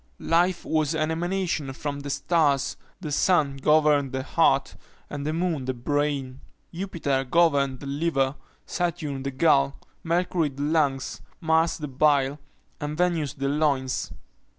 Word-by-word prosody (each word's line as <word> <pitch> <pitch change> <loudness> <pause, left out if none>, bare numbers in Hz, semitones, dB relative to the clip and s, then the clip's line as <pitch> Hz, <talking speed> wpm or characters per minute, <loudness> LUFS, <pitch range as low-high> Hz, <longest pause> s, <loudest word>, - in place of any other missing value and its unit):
Life 175 +1 +3
was 155 -1 0
an 155 0 0
emanation 175 -4 -1
from 145 +1 -4
the 140 0 -6
stars 145 -3 +1 0.3
the 155 -5 -5
sun 145 -3 +2
governed 150 -1 +3
the 130 0 -3
heart, 140 -2 +2 0.4
and 145 0 -4
the - - +1
moon 165 -4 -1
the 130 0 -2
brain. 140 0 -2 0.3
Jupiter 165 -7 -1
governed 140 -3 +2
the - - -7
liver, 140 -2 0 0.3
Saturn 165 -6 -2
the 135 - -2
gall, 140 -1 +2 0.2
Mercury 170 -1 +1
the 140 +1 -6
lungs, 145 -4 0 0.2
Mars 160 0 +2
the 150 - -5
bile, 140 0 +2 0.4
and 150 +1 -4
Venus 165 -6 0
the 135 0 -2
loins. 140 -3 0
145 Hz, 140 wpm, -25 LUFS, 140-165 Hz, 0.4 s, Life